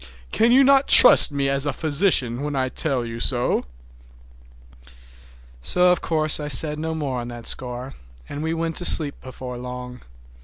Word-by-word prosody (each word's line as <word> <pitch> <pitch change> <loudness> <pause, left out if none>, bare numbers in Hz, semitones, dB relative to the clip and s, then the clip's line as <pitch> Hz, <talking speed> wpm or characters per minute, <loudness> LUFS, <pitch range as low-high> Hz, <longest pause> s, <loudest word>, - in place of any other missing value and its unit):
Can 230 +2 0
you 265 +3 +4
not 275 0 +2
trust 250 - +8
me 140 -1 -3
as 140 +1 -3
a - - -3
physician 145 -6 0
when 145 0 -6
I 130 -1 -3
tell 130 -3 -2
you 115 0 -9
so?" 120 0 -2 2.0
So 180 - +1
of 180 - -2
course 155 -2 0
I 150 - -6
said 150 +2 +1
no 160 +1 -5
more 140 -5 -5
on 120 - -8
that 120 -1 -11
score, 125 +1 -4 0.3
and 145 - -8
we 160 +1 -4
went 165 0 -5
to 175 - -2
sleep 150 -5 +2
before 125 -1 -10
long. 125 0 -10
140 Hz, 170 wpm, -20 LUFS, 125-160 Hz, 2.0 s, trust